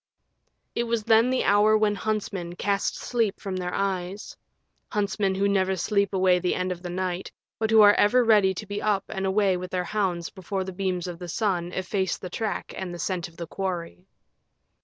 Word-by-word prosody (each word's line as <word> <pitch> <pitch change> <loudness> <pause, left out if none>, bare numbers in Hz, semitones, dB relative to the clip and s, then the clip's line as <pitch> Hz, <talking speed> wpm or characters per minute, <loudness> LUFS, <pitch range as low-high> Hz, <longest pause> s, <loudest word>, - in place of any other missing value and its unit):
It 235 - -1
was 230 -2 -1
then 225 +2 +4
the 260 0 +1
hour 210 +2 +5
when 215 -1 +2
huntsmen 200 -5 -3
cast 200 +1 0
sleep 230 -5 -1
from 195 -2 -4
their 180 -1 -3
eyes 195 0 -3 0.5
huntsmen 200 -1 0
who 200 +1 +2
never 190 -1 +2
sleep 200 +2 +1
away 185 -2 +3
the 180 0 0
end 185 0 -1
of 175 -1 -5
the 180 - -6
night, 180 0 -3 0.3
but 220 -1 0
who 220 -1 +7
are 205 0 +8
ever 245 +5 +4
ready 205 -4 +4
to 210 - -6
be 205 +1 -4
up 205 -2 +1
and 195 -1 -2
away 190 -1 +2
with 180 0 -6
their 180 -1 -1
hounds 180 -3 -1
before 190 0 -4
the 190 0 -6
beams 185 -2 -2
of 175 -2 -6
the 175 -1 -7
sun 180 -3 -1
efface 190 +1 -1
the 185 - -8
track 215 0 -3
and 190 -2 -5
the 175 - -6
scent 175 -1 -2
of 170 -1 -19
the 170 - -5
quarry. 180 0 -5
190 Hz, 200 wpm, -26 LUFS, 180-210 Hz, 0.5 s, are